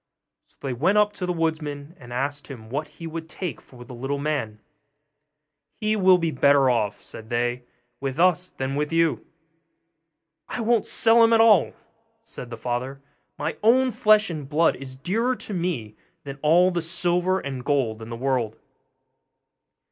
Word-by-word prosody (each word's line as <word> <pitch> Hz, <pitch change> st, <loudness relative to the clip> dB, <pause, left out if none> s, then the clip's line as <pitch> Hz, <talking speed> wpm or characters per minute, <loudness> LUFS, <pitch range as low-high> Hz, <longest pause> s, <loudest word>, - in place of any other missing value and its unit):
So -, -, -33 dB
they 135 Hz, -2 st, -3 dB
went 170 Hz, -, +2 dB
up 210 Hz, 0 st, +3 dB
to 180 Hz, -, -4 dB
the -, -, 0 dB
woodman, 160 Hz, -2 st, -3 dB
and 120 Hz, -2 st, -13 dB
asked 140 Hz, +4 st, -3 dB
him 115 Hz, -5 st, -10 dB
what 150 Hz, +3 st, -2 dB
he 165 Hz, -, -11 dB
would 165 Hz, 0 st, -6 dB
take 180 Hz, -3 st, -5 dB
for 120 Hz, -2 st, -14 dB
the 125 Hz, -, -11 dB
little 135 Hz, +4 st, -3 dB
man. 140 Hz, -8 st, -3 dB, 1.2 s
'He 215 Hz, -1 st, +1 dB
will 190 Hz, -3 st, +5 dB
be 165 Hz, -2 st, -1 dB
better 140 Hz, -1 st, +4 dB
off,' 105 Hz, -4 st, -1 dB
said 110 Hz, 0 st, -10 dB
they, 120 Hz, +1 st, -1 dB, 0.3 s
'with 135 Hz, +2 st, -4 dB
us 180 Hz, 0 st, +3 dB
than 135 Hz, +1 st, -4 dB
with 150 Hz, +2 st, -2 dB
you.' 165 Hz, -1 st, +1 dB, 1.3 s
'I -, -, -3 dB
won't 230 Hz, 0 st, +2 dB
sell 230 Hz, +1 st, +5 dB
him 230 Hz, 0 st, +5 dB
at 225 Hz, -, +5 dB
all,' 220 Hz, -5 st, +5 dB, 0.5 s
said 125 Hz, -, -8 dB
the 115 Hz, -, -7 dB
father; 125 Hz, +3 st, -3 dB, 0.4 s
'my -, -, -3 dB
own 255 Hz, +4 st, +4 dB
flesh 215 Hz, -3 st, +3 dB
and 150 Hz, -4 st, -6 dB
blood 160 Hz, +3 st, +3 dB
is 130 Hz, -1 st, -9 dB
dearer 225 Hz, -, 0 dB
to 215 Hz, -, -7 dB
me 170 Hz, -, -3 dB, 0.3 s
than 140 Hz, -1 st, -8 dB
all 175 Hz, +4 st, +4 dB
the 175 Hz, -1 st, -1 dB
silver 175 Hz, +3 st, 0 dB
and 135 Hz, -6 st, -6 dB
gold 125 Hz, -7 st, 0 dB
in 110 Hz, -, -8 dB
the 115 Hz, -, -5 dB
world. 125 Hz, -4 st, -1 dB
150 Hz, 170 wpm, -24 LUFS, 130-185 Hz, 1.3 s, will